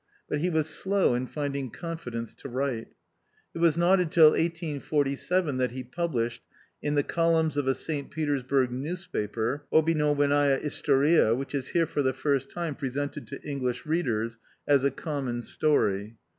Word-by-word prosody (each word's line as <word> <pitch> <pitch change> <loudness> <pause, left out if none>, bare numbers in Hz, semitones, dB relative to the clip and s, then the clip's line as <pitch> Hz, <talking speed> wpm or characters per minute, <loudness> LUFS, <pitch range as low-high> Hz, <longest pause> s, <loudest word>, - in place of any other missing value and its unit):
But 150 - -1
he 175 +4 +1
was 160 -3 +1
slow 190 -2 +1
in 125 +1 -1
finding 140 -2 -3
confidence 120 -7 -6
to - - -9
write. 130 -2 -2 0.7
It - - -6
was 170 -1 +4
not 180 +3 +4
until 160 -3 +6
1847 155 -1 0
that 125 -1 +1
he 130 0 -5
published, 120 -5 -2 0.4
in 150 0 -1
the 145 - +3
columns 165 -2 +1
of 145 -2 0
a 135 - +3
St. 145 -3 -4
Peters 145 -3 -1
burg 130 0 +1
newspaper, 140 - -3
Obyknowenndia 145 -3 +3
istorita, 140 -4 +3
which 135 +2 -5
is 135 -2 -2
here 170 -1 +2
for 150 - -1
the 130 -1 +1
first 135 0 0
time 170 -3 -3
presented 140 +1 -4
to 140 - -7
English 130 -4 -3
readers 115 -8 -1 0.3
as 140 -2 +4
A 140 - +4
Common 135 -4 -4
Story. 105 -9 0
145 Hz, 155 wpm, -27 LUFS, 130-160 Hz, 0.7 s, until